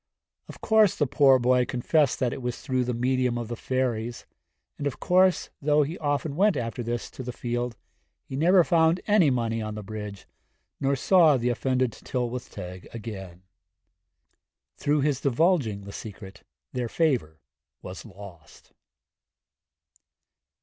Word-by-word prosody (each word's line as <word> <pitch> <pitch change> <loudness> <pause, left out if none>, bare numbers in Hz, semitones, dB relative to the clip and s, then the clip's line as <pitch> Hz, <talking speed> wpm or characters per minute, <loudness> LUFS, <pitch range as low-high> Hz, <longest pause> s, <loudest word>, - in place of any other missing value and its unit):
Of - - -12
course 220 -4 +4
the 145 - +1
poor 135 -1 +5
boy 125 0 +3
confessed 130 +4 +1
that 125 -3 0
it - - -6
was 125 -1 -3
through 130 -2 -1
the 125 - -1
medium 125 0 +1
of 120 -2 -5
the 120 - -3
fairies, 120 -2 -2 0.5
and 145 - -1
of 140 - -5
course, 185 0 +3
though 150 +1 +3
he 155 +4 -4
often 145 0 -1
went 200 +3 +3
after 115 +1 -3
this 120 0 -4
to - - -8
the 125 0 -5
field, 120 -1 -3 0.5
he 130 - -7
never 175 +5 +5
found 165 0 +3
any 205 -7 +4
money 115 -3 -1
on 110 0 -5
the 105 - -6
bridge, 105 -1 -7 0.5
nor 140 0 +1
saw 160 0 +5
the 120 0 0
offended 130 0 0
Tylwyth 125 +1 -4
Teg 90 0 -9
again. 95 -6 -8 1.3
Through 145 0 +1
his 140 -2 0
divulging 140 - +1
the 100 - -9
secret 95 -3 -9 0.3
their 125 -2 -2
favour 120 - 0 0.4
was 90 0 -8
lost. 95 -8 -14
125 Hz, 150 wpm, -26 LUFS, 115-145 Hz, 1.3 s, poor